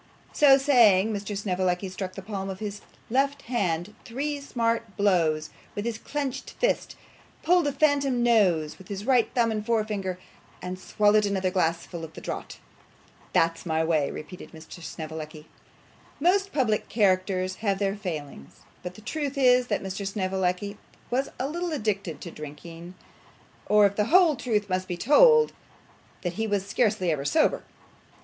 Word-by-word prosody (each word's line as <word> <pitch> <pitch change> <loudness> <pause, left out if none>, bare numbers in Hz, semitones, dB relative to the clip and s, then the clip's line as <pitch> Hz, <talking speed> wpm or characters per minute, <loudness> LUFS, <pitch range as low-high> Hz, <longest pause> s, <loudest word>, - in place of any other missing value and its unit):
So 275 -2 +7
saying, 225 -7 +4
Mr. 205 0 -4
Snevellicci 185 -1 -1
struck 185 0 -5
the 195 - -7
palm 195 -1 -4
of 190 - -5
his 205 0 -6 0.3
left 275 +2 +1
hand 195 -5 -1
three 285 +4 -3
smart 230 -5 -2
blows 165 -6 +2 0.2
with 205 - -3
his 230 -1 -3
clenched 280 -1 -4
fist; - - 0 0.5
pulled 350 -3 +3
a - - +1
phantom 275 -3 +2
nose 185 -10 +2
with 190 - -13
his 200 0 -6
right 250 -3 +3
thumb 235 -2 +3
and 215 -1 -2
forefinger, 210 -5 -1 0.4
and 180 +1 -6
swallowed 210 +1 +3
another 190 -2 0
glassful 170 -2 -1
at 160 - -10
a - - -4
draught. - - -6 0.7
'That's 165 0 +1
my 160 -2 0
way,' 155 -3 +1
repeated 180 +5 -9
Mr. 160 +2 -11
Snevellicci. 155 -1 -7 0.7
Most 385 +5 +2
public 230 -7 0
characters 185 -3 +1
have 200 -3 0
their 195 0 0
failings; 150 - -7 0.2
and 180 0 -5
the 215 - -12
truth 285 +4 -3
is 250 -2 +4
that 205 - -1
Mr 195 +1 -4
Snevellicci 190 0 -2 0.3
was 265 +3 0
a 260 - -2
little 345 +3 -3
addicted 205 - -2
to 170 - -7
drinking; 165 +4 -10 0.7
or, 210 -1 +6
if 200 0 +1
the 210 - +2
whole 340 - +5
truth 215 -5 -1
must 185 -1 -2
be 175 - -4
told, 460 - +5 0.7
that 175 -2 -2
he 220 +4 -2
was 200 -2 -1
scarcely 205 -4 +1
ever 145 -3 -2
sober. 310 - +2
205 Hz, 155 wpm, -26 LUFS, 180-245 Hz, 0.7 s, So